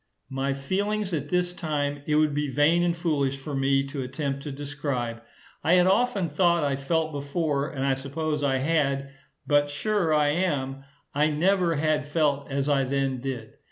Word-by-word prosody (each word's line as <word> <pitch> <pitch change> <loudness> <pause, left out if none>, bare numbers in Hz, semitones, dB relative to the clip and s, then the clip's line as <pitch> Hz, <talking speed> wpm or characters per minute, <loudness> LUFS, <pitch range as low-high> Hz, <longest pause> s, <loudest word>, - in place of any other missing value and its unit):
My 135 +1 -1
feelings 200 +7 -1
at 145 -2 -2
this 180 +1 +1
time 145 -4 -2
it 150 - +2
would 155 -1 +3
be 145 0 -1
vain 150 +6 +3
and 175 -1 +1
foolish 145 -6 0
for 140 +2 -7
me 135 0 +2
to 140 0 -5
attempt 140 +1 -3
to 145 - -6
describe. 135 -5 -3 0.4
I 170 - +4
had 180 0 +5
often 200 -1 +2
thought 170 +1 +2
I 140 -2 +1
felt 155 +3 -1
before, 145 0 -1
and 135 -3 -3
I 135 - +3
suppose 150 +3 -3
I 135 -2 +2
had, 140 -1 0 0.3
but 145 -1 +3
sure 180 +3 0
I 150 -1 +3
am, 140 -5 -1 0.3
I 150 +2 +3
never 175 +2 +2
had 150 -1 0
felt 145 -2 0
as 140 0 -1
I 140 -2 +3
then 135 -1 -1
did. 120 -4 -5
145 Hz, 180 wpm, -26 LUFS, 135-165 Hz, 0.4 s, had